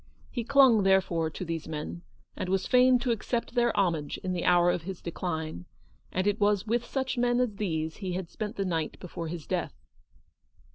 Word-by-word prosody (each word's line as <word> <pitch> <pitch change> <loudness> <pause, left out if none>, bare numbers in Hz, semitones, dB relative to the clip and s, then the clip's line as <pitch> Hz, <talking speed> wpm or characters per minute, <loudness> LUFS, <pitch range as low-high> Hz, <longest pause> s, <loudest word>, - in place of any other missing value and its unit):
He 240 - -2
clung, 265 -3 +6
there 190 0 +5
fore, 165 -4 -2
to 180 +4 -6
these 165 -1 -4
men, 155 +2 -5 0.3
and 180 - -4
was 190 0 +1
fain 255 0 +5
to 245 0 -1
accept 235 +2 -2
their 240 -1 +3
homage 165 -7 0
in 185 - -1
the 175 - -2
hour 175 0 +5
of 175 - -2
his 185 +2 -6
decline; 160 - -4 0.5
and 185 +1 -1
it 205 +1 +1
was 205 -1 +2
with 235 +2 0
such 265 -2 -2
men 245 0 +2
as 235 -5 0
these 160 -6 -2
he 190 -3 -4
had 180 -1 -3
spent 215 0 -4
the 195 - -1
night 165 -4 -2
before 170 -2 -6
his 160 -1 -6
death. - - -2
190 Hz, 200 wpm, -28 LUFS, 170-235 Hz, 0.5 s, clung